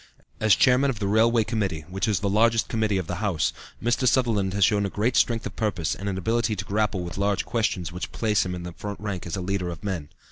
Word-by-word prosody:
As 110 -3 +5
Chairman 130 +2 +4
of 125 - -2
the 100 - -2
Railway 110 +3 +3
Committee, 100 -8 -2
which 95 +4 -2
is 105 -3 +1
the 100 - 0
largest 115 +3 +3
committee 110 -3 0
of 95 - -2
the 90 +2 -4
House, 95 -7 0 0.3
Mr. 120 +2 +1
Sutherland 110 -7 +2
has 100 -2 +5
shown 100 -1 +2
a 105 +4 0
strength 115 -1 +2
of - - -6
purpose 90 -8 -1
and 100 +1 -4
an 95 - -3
ability 115 +3 0
to 100 0 -5
grapple 105 -2 0
with 85 +2 -6
large 100 0 +1
questions 105 -7 -1
which 90 +1 -5
place 105 -2 +1
him 90 -1 -4
in 90 - -6
the 90 - -6
front 100 +3 -6
rank 100 -4 -4
as 85 - -3
a 95 - -3
leader 90 -1 -2
of 85 -3 -8
men. 90 -7 -3
100 Hz, 245 wpm, -25 LUFS, 95-110 Hz, 0.3 s, As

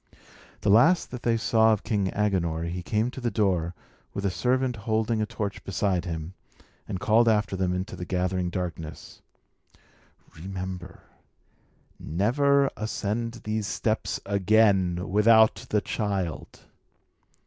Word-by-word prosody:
The 100 - +2
last 160 - +4
that 125 - -6
they 115 -1 +1
saw 110 0 +4
of 105 - -3
King 105 -3 0
Agenor, 90 -6 0
he 85 +2 -4
came 110 +6 -1
to 130 - -8
the 120 - 0
door, 90 -5 0 0.4
with 100 - -3
a 100 - +1
servant 125 +4 0
holding 110 +1 -1
a 105 - -1
torch 100 -2 -4
beside 95 -2 -1
him, 80 0 -5 0.5
and 95 - -4
called 115 +3 +4
after 105 -3 +1
them 95 -1 0
into 90 +3 -3
the - - -6
gathering 90 0 -1
darkness: 85 -4 -6 1.1
"Remember! 95 0 -7 1.0
Never 140 - +2
ascend 115 +2 -3
these 105 -1 -2
steps 110 +3 -1
again 100 -2 +2
without 110 +2 +4
the 105 - +2
child!" 100 -7 -3
100 Hz, 130 wpm, -26 LUFS, 90-110 Hz, 1.1 s, last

